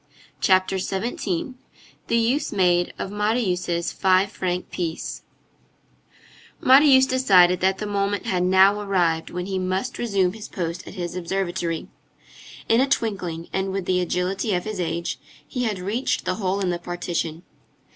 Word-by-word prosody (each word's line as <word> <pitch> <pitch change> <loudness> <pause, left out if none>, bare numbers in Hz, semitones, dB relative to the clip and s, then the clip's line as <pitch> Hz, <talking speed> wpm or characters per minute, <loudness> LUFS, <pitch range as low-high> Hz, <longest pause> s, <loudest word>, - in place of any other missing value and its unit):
CHAPTER 185 0 +3
XVII—THE 225 +5 -4
USE 240 +6 +1
MADE 175 -3 +2
OF 195 - -4
MARIUS' 195 -5 0
FIVE 190 +1 +2
FRANC 180 -3 -3
PIECE 165 -2 -4 1.4
Marius 265 0 +6
decided 190 -9 +4
that 190 +1 +2
the 210 - -4
moment 200 0 -1
had 180 -1 0
now 190 +3 +5
arrived 175 -5 0
when 180 0 -4
he 190 -1 -2
must 185 +6 -2
resume 195 -6 +1
his 220 -1 -8
post 170 -1 -5
at - - -9
his 175 -2 -4
observatory. 175 -2 -2 0.8
In 230 +2 +4
a 270 - +1
twinkling, 180 -9 -2
and 190 0 -1
with 195 -1 -3
the 180 0 +1
agility 180 +4 -1
of 175 - -1
his 215 -3 -4
age, 170 0 -2 0.3
he 250 -2 -2
had 215 -3 -1
reached 205 +8 -2
the - - 0
hole 195 +1 0
in 185 -2 0
the 175 - -3
partition. 175 -1 -4
190 Hz, 145 wpm, -23 LUFS, 180-205 Hz, 1.4 s, Marius